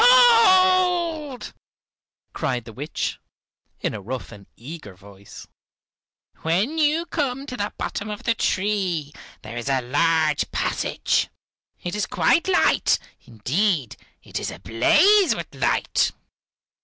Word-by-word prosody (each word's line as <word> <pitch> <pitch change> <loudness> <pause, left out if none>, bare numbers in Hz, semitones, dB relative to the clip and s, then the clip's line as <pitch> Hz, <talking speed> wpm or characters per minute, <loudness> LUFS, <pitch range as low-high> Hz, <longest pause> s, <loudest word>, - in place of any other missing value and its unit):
Gold!" 370 - +4 0.8
cried 125 -3 -2
the 115 - -10
witch, 145 +7 -4 0.6
in - - -2
a 105 - -6
rough 125 +5 -6
and 100 -2 -13
eager 130 - -10
voice. 100 +1 -14 0.9
"When 200 - -1
you 310 +2 +2
come 275 -5 -3
to 255 - -6
the 205 -2 -3
bottom 210 - -4
of 210 -1 -6
the 230 - +2
tree 185 -9 -1 0.3
there 110 +3 -8
is 120 +3 -4
a 135 -1 +2
large 155 +3 +1
passage. - - -1 0.6
It 175 - -4
is 210 0 -1
quite 335 - +2
light, 375 - +3 0.3
indeed 135 - -1 0.3
it - - -5
is - - -4
ablaze 380 - +3
with - - -7
light. - - +1
195 Hz, 120 wpm, -23 LUFS, -, 0.9 s, Gold